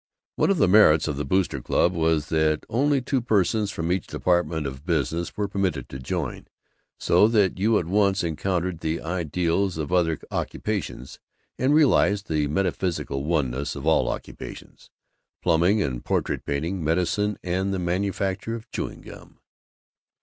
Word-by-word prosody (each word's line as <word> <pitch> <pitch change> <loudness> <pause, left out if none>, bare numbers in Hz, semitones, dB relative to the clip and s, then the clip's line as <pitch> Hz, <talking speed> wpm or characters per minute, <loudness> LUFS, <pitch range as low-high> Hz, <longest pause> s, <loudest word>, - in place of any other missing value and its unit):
One - - +2
of 195 - +2
the 130 - +4
merits 90 -6 +6
of 75 -3 -2
the 75 - -2
Boosters' 80 -4 0
Club 90 +8 +2
was 80 -3 +1
that 80 -1 +1
only 140 +2 +1
two 130 0 0
persons 105 -2 +1
from 85 -2 -3
each 90 -2 -1
department 85 -3 0
of 65 0 -6
business 85 +1 -1
were 105 -1 0
permitted 100 -2 -2
to 65 - -7
join, 75 +2 -4 0.5
so 105 - +4
that 105 -5 +2
you 110 +2 +3
at 85 - -1
once 100 +1 +2
encountered 85 +1 -2
the 80 +1 -2
Ideals 85 +2 -1
of 80 +2 -3
other 80 -3 +2
occupations, 100 - -4 0.4
and 135 +4 +3
realized 110 -9 +3
the 75 -2 +1
metaphysical 85 -4 -1
oneness 70 -4 -1
of 70 0 -7
all 80 - +3
occupations - - -8 0.5
plumbing 90 +6 +3
and 60 -2 -4
portrait - - -1
painting, 80 +5 -2
medicine 90 +6 0
and 95 +2 -1
the 95 - -1
manufacture 95 +4 -2
of 115 -1 -10
chewing - - -5
gum. - - -13
90 Hz, 155 wpm, -24 LUFS, 80-100 Hz, 0.5 s, merits